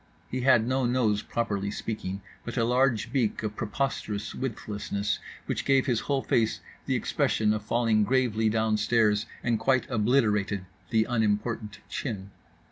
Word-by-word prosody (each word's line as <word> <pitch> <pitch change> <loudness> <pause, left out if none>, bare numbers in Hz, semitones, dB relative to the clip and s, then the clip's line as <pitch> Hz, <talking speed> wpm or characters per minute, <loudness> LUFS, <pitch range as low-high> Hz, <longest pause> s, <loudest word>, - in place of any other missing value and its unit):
He 130 - -1
had 120 -3 +5
no 130 +1 +1
nose, 115 -4 +2
properly 100 -4 -2
speaking, 100 -2 -4 0.2
but 120 - -6
a 115 - +3
large 125 -1 +2
beak 120 -5 0
of 105 -1 -3
preposterous 105 -3 -2
widthlessness, 105 -4 -3 0.3
which - - -2
gave 135 -1 +3
his 125 -4 +1
whole 140 +1 -1
face 110 -2 +1 0.3
the - - +1
expression 105 -1 +1
of 110 - -2
falling 110 0 +2
gravely 110 -1 +2
downstairs, 110 0 +2 0.2
and 115 -2 +1
quite 130 +3 +2
obliterated 105 -4 +2 0.2
the 110 -1 +3
unimportant 110 -1 -1
chin. 100 -8 -4
110 Hz, 140 wpm, -28 LUFS, 105-125 Hz, 0.3 s, had